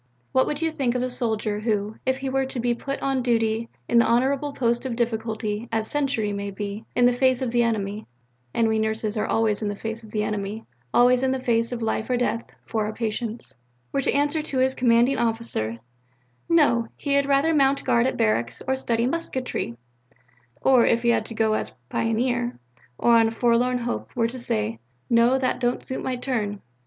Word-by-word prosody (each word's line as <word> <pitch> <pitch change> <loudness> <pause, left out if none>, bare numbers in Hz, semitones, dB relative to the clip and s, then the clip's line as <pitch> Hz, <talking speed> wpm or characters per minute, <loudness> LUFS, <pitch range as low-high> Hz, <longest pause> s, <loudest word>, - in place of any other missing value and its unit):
What 260 - +3
would 300 +2 -2
you 325 - +1
think 260 -5 -1
of 250 - 0
a 255 - -2
soldier 220 -3 -1
who 215 -1 -1
if 260 0 +2
he 270 0 -4
were 265 0 0
to 260 - -4
be 240 0 +1
put 275 +3 -4
on 270 -1 +1
duty 230 -2 +1 0.2
in 235 - +4
the - - +4
honourable 270 +4 +1
post 240 -3 0
of 255 -3 -3
difficulty, 220 -1 -2
as 220 -1 0
sentry 270 -8 0
may 200 0 -3
be, 200 +2 -5
in 245 - +4
the 245 - +6
face 260 +1 +2
of 245 - -1
the 240 0 +3
enemy 215 -2 -1 0.4
(and 230 - +2
we 220 0 +1
nurses 220 0 -1
are 215 - -1
always 220 -2 +1
in 210 - -1
the 205 - -3
face 225 +2 -5
of 220 - -12
the 210 0 -1
enemy, 210 +1 -3 0.3
always 245 +1 +5
in 265 - +2
the 265 - -1
face 230 -2 +1
of 240 -2 -3
life 220 +1 -1
or 250 - +2
death 235 -1 0 0.2
for 220 -2 -1
our 215 - -4
patients) 225 +1 -4 0.4
were 275 - 0
to - - +1
answer 290 +2 +1 0.2
his 260 +1 +3
commanding 245 +1 +3
officer, 225 - -1 0.7
'No, 285 -9 +4
he 285 - -1
had 280 0 +3
rather 285 +4 +3
mount 275 -2 +3
guard 235 +1 +3
at - - -2
barracks 115 +2 0
or 265 - +2
study 235 -3 0
musketry'; 260 - -3 0.9
or, 255 -3 +6
if 230 +1 +2
he 235 - +3
had 235 - +2
to 230 - -7
go 220 -1 +2
as - - -3
pioneer, 240 +2 0 0.4
or 235 -1 +5
on 225 -1 +5
a - - -2
forlorn 240 +2 +2
hope, 240 0 -3
were 230 -2 +2
to 255 +2 -6
say, 110 - -1 0.3
'No, 235 +3 +5
that 255 -1 0
don't 245 -1 -1
suit 260 - -4
my 255 - -1
turn?'" 225 -6 -2
235 Hz, 210 wpm, -24 LUFS, 220-260 Hz, 0.9 s, the